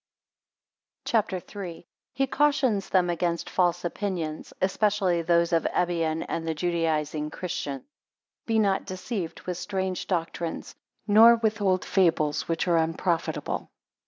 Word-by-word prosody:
CHAPTER 215 -4 +1
III. 185 -1 -7
1 - - -17 0.3
He 270 +1 +2
cautions 270 -7 +1
them 185 -2 +3
against 170 0 -2
false 175 -1 +1
opinions. 170 -4 -3
3 190 - +3
Especially 195 -3 +1
those 170 0 +2
of 165 - +2
Ebion 165 -2 0
and 165 0 -3
the 160 - -1
Judaising 155 -2 -1
Christians. 145 -7 -4 0.6
BE 225 -1 +2
not 200 -3 +2
deceived 185 -2 -4
with 180 -1 -4
strange 190 -1 -3
doctrines; 170 -2 -3 0.3
nor 225 +3 +8
with 220 -1 -1
old 185 -2 +2
fables 160 -6 +2
which 165 +2 -1
are 170 -1 +4
unprofitable. 165 +1 -1
180 Hz, 130 wpm, -26 LUFS, 165-200 Hz, 0.6 s, nor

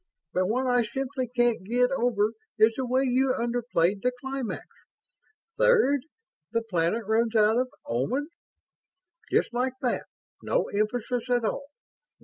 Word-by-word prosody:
but 185 0 +1
what 250 +5 0
I 245 -1 +3
simply 260 +3 -3
can't 240 -3 +1
get 245 +5 +2
over 230 -5 +1 0.3
is 220 +1 +5
the 260 -2 -2
way 260 +2 +2
you 255 0 +2
underplayed 230 -6 0
the 250 - +2
climax. 265 -3 -4 0.9
'Third, 440 - +4 0.5
the 230 0 0
planet 195 +1 0
runs 225 +2 +1
out 220 +2 +4
of 255 0 0 0.2
Omans'. 255 - -1 1.0
Just - - +2
like 250 +1 0
that 250 - -1 0.3
no - - 0
emphasis 235 +3 -1
at 245 -2 +2
all. 280 +5 -2
245 Hz, 135 wpm, -27 LUFS, 220-260 Hz, 1.0 s, is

